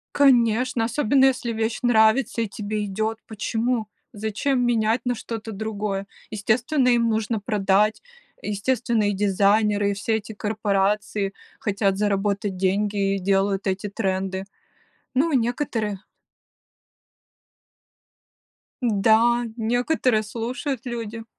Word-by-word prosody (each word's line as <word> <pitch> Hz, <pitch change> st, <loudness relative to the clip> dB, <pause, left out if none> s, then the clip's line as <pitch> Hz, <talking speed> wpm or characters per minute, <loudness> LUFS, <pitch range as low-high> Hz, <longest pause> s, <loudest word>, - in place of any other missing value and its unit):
Конечно, 245 Hz, -3 st, +3 dB
особенно 265 Hz, +2 st, +2 dB
если 250 Hz, -3 st, +1 dB
вещь 220 Hz, 0 st, -2 dB
нравится 230 Hz, 0 st, +3 dB
и -, -, -1 dB
тебе 210 Hz, +1 st, -3 dB
идет. 215 Hz, +3 st, -2 dB
Почему? 225 Hz, +1 st, -2 dB, 0.2 s
Зачем 220 Hz, +5 st, -1 dB
менять 230 Hz, 0 st, +2 dB
на 245 Hz, -1 st, 0 dB
что-то 225 Hz, 0 st, -6 dB
другое? 205 Hz, -2 st, -3 dB, 0.2 s
Естественно, 245 Hz, +7 st, +1 dB
им 235 Hz, -1 st, +3 dB
нужно 220 Hz, 0 st, -1 dB
продать, 205 Hz, 0 st, +1 dB, 0.4 s
естественно, 225 Hz, +1 st, 0 dB
и -, -, 0 dB
дизайнеры, 205 Hz, +1 st, +2 dB
и -, -, -1 dB
все 220 Hz, +3 st, 0 dB
эти 220 Hz, +1 st, -9 dB
корпорации, 205 Hz, -1 st, -1 dB, 0.3 s
хотят 200 Hz, -1 st, 0 dB
заработать 200 Hz, -1 st, 0 dB
деньги 195 Hz, +1 st, 0 dB
и -, -, -2 dB
делают 195 Hz, +1 st, +1 dB
эти 195 Hz, +2 st, -1 dB
тренды. 190 Hz, -2 st, -2 dB, 0.7 s
Ну, 290 Hz, +6 st, +2 dB
некоторые 235 Hz, -5 st, -1 dB, 2.8 s
Да, 230 Hz, +2 st, +3 dB
некоторые 245 Hz, 0 st, +1 dB
слушают 240 Hz, +4 st, -4 dB
люди. 230 Hz, -2 st, -5 dB
220 Hz, 105 wpm, -23 LUFS, 200-235 Hz, 2.8 s, Конечно